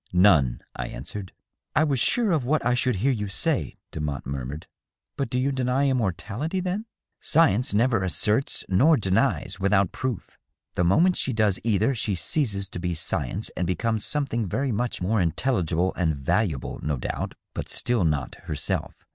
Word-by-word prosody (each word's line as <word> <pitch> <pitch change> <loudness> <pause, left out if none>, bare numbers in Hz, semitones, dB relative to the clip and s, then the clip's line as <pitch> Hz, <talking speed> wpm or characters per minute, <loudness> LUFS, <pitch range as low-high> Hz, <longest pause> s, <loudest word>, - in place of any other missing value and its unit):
" - - -32
None," 90 -9 +4
I - - -3
answered. 90 +9 -7 0.4
"I 155 - +5
was 140 -5 +1
sure 225 - +3
of 155 -6 +2
what 150 +3 0
I 125 - +3
should 125 0 +1
hear 130 +9 +2
you 105 -5 -2
say," 95 - 0
Demotte 75 -3 -4
murmured. 70 +3 -5 0.3
" - - -64
But 140 - -2
do 125 - -1
you 135 +2 +1
deny 130 +1 +1
immortality, 120 - -1
then 185 +4 -2
?" - - -65
" - - -55
Science 135 -7 +3
never 115 -2 +3
asserts 105 - 0
nor 140 - +5
denies 95 -2 0
without 100 -1 +2
proof. 130 -6 -4 0.3
The 90 - +1
moment 165 - +4
she 130 - 0
does 105 -4 +2
either 115 +4 +2
she 110 -4 -1
ceases 100 - -1
to - - -6
be 90 -1 -2
science 75 -4 -2
and 90 - -1
becomes 110 +4 0
something 130 -7 0
very 135 +8 -1
much 115 -3 -2
more 105 +2 +2
intelligible 90 - 0
and 80 -4 0
valuable, 80 - -1
no 75 -2 -1
doubt, - - -4 0.2
but - - -5
still 120 -5 +1
not 75 -6 0
herself. 75 -4 -2
105 Hz, 180 wpm, -25 LUFS, 90-130 Hz, 0.4 s, I